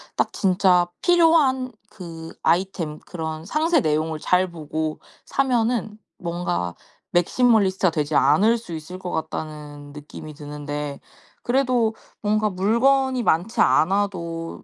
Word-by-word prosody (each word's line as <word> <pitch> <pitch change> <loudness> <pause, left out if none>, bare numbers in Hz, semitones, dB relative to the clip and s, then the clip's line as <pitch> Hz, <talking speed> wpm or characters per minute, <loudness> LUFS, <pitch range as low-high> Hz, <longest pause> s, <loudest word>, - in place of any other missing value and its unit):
딱 - - 0
진짜 185 -2 +3 0.2
필요한 320 -7 +4 0.2
그 165 -4 -9
아이템 170 -4 0
그런 160 -2 -6
상세 315 - +2
내용을 155 -1 0
잘 180 +4 +1
보고 155 -1 -4 0.3
사면은 235 -5 0 0.2
뭔가 170 - -3 0.4
'맥시멀리스트가 190 -1 +3
되지 150 -1 -2
않을 200 - +4
수 225 -7 -9
있을 160 +3 -7
것 185 -1 -6
같다.'는 150 -2 -6
느낌이 150 +1 -10
드는데 145 -1 -6 0.4
그래도 245 -3 +1 0.3
뭔가 215 +1 +1
물건이 250 +7 +2
많지 195 +2 +1
않아도 170 -2 0
180 Hz, 255 characters per minute, -23 LUFS, 155-225 Hz, 0.4 s, 필요한